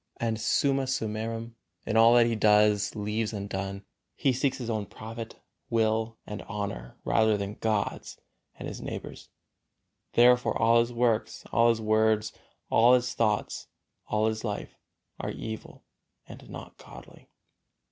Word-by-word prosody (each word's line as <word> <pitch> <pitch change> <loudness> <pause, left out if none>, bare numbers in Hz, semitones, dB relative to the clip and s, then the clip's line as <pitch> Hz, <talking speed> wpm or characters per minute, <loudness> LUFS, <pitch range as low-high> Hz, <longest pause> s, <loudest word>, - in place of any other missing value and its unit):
and 115 -1 -2
summa 135 +3 +2
summarum, 115 -1 -3 0.3
in 110 - -2
all 115 +1 +7
that 120 -1 +6
he 115 -1 0
does 105 -1 +4
and 105 - -4
leaves 110 +1 -1
undone, 100 -1 -4 0.3
he 135 -4 +2
seeks 135 +1 0
his 125 -3 -6
own 110 -3 -1
profit, 110 +3 -8 0.3
will 115 0 +1
and 105 -1 -6
honor 100 - -5
rather 110 -1 +3
than 100 0 -4
God's 110 -1 -2 0.4
and - - -6
his - - -7
neighbor's. - - -7 0.8
Therefore 125 +1 +4
all 115 +1 +5
his 115 +1 +1
works, 115 -2 0
all 115 0 +4
his 115 -1 +2
words, 110 0 +2 0.4
all 120 +3 +6
his 125 -1 0
thoughts, 105 -3 -1 0.4
all 110 0 +1
his 110 0 -1
life 105 -3 -4 0.5
are - - -3
evil 110 -1 -7 0.4
and - - -12
not - - -10
godly. - - -14
110 Hz, 145 wpm, -28 LUFS, 105-115 Hz, 0.8 s, all